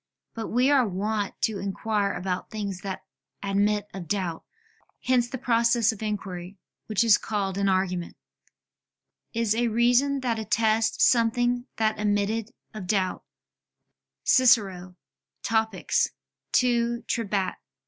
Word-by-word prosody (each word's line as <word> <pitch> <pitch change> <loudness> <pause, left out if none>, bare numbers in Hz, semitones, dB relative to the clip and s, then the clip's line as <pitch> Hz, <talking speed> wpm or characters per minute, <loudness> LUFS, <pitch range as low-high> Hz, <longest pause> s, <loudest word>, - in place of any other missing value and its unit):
But 225 -1 -5
we 250 +4 +2
are 265 -5 +4
wont 205 +2 -2
to 215 -3 0
inquire 200 +1 -1
about 180 0 -3
things 200 -4 -5
that 195 -1 -5 0.4
admit 205 +1 +1
of 185 -3 -7
doubt; 180 -4 -2 0.6
hence 250 -2 +2
the 260 - -4
process 235 -1 +3
of 220 - -10
inquiry, 195 -3 -5 0.3
which 215 +1 +2
is 225 -3 +5
called 200 -3 -2
an 200 0 +2
argument, 185 -2 -1 1.1
"is 230 -2 +1
a 235 +2 +1
reason 245 +5 +2
that 235 -3 -1
attests 220 +1 +2
something 245 +1 +2
that 220 -1 +1
admitted 210 +1 0 0.2
of 210 -4 -7
doubt" 190 -2 0 1.0
[*Cicero, 195 -8 +3 0.5
Topic. 220 -3 -1
ad 235 -1 0
Trebat. 200 -5 -1
215 Hz, 120 wpm, -26 LUFS, 195-235 Hz, 1.1 s, is